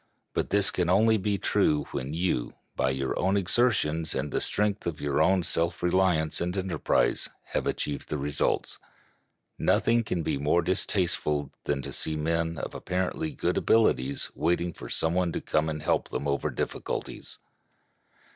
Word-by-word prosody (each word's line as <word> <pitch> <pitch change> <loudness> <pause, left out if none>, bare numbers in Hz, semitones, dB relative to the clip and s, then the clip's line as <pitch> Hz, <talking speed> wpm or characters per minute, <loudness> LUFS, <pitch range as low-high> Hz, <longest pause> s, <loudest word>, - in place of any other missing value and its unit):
But - - -1
this 100 -1 +3
can 90 -1 0
only 110 +4 +4
be 100 0 0
true 75 -5 +2
when 65 +2 -4
you, 80 -6 -1 0.2
by 65 - +1
your 65 0 -1
own 95 +2 +2
exertions 90 - +1
and 70 +2 -2
the - - 0
strength 105 -2 0
of 80 -3 -3
your 70 0 0
own 90 +3 +3
self 85 +1 0
reliance 90 -3 +2
and 90 +2 -2
enterprise, 95 -2 +1 0.2
have - - -1
achieved 70 -2 -3
the 75 - -1
results. 70 0 -1 0.8
Nothing 115 0 +3
can 85 -6 -2
be 70 - -1
more 75 +4 +2
distasteful 80 -6 0
than 70 - -1
to - - -6
see 80 - -1
men 80 +1 -1
of - - -5
apparently 95 - -2
good 90 - -1
abilities 70 - +2
waiting 85 +1 0
for - - -9
some 80 +1 +1
one 90 -1 +1
to - - -1
come 75 +1 0
and 75 -1 -4
help - - +1
them 70 - -3
over 70 0 0
difficulties. - - -4
85 Hz, 165 wpm, -28 LUFS, 75-95 Hz, 0.8 s, only